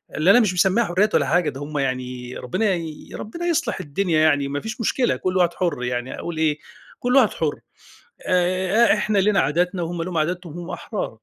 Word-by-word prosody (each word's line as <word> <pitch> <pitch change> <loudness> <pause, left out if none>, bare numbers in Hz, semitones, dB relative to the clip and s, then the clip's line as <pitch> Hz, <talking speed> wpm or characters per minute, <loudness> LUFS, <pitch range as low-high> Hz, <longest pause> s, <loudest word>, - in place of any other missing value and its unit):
اللي 165 +6 +4
أنا 245 - +7
مش 205 -6 +2
مسمِّيها 190 +6 +3
حُرّيات 200 +4 +1
ولا - - +3
حاجة، 170 -3 +2
ده 135 +1 -8
هُم 150 0 -5
يعني 125 -2 -3
ربنا 195 - 0
يي 165 -3 -6
ربنا 335 +11 -6
يصلِح 335 - 0
الدنيا 165 0 0
يعني، 145 -3 +3
ما 145 +1 -3
فيش 225 +2 -6
مشكلة، 245 +3 +1
كل 185 0 -1
واحد 175 -1 +3
حُر 160 -9 -2
يعني، 125 +1 -3
أقول 170 -2 -5
إيه، 155 -2 +1 0.4
كل 250 +2 0
واحد 250 -6 +6
حُر. 155 -3 -2 0.7
آآ، 185 +5 +3
إحنا 215 -1 0
لينا 195 0 +3
عادتنا 175 +6 0
وهُم 165 0 -3
ليهُم 180 -1 -4
عاداتهم، 170 +1 -2
هُم 175 - -8
أحرار. 215 - -4
175 Hz, 200 wpm, -22 LUFS, 150-200 Hz, 0.7 s, أنا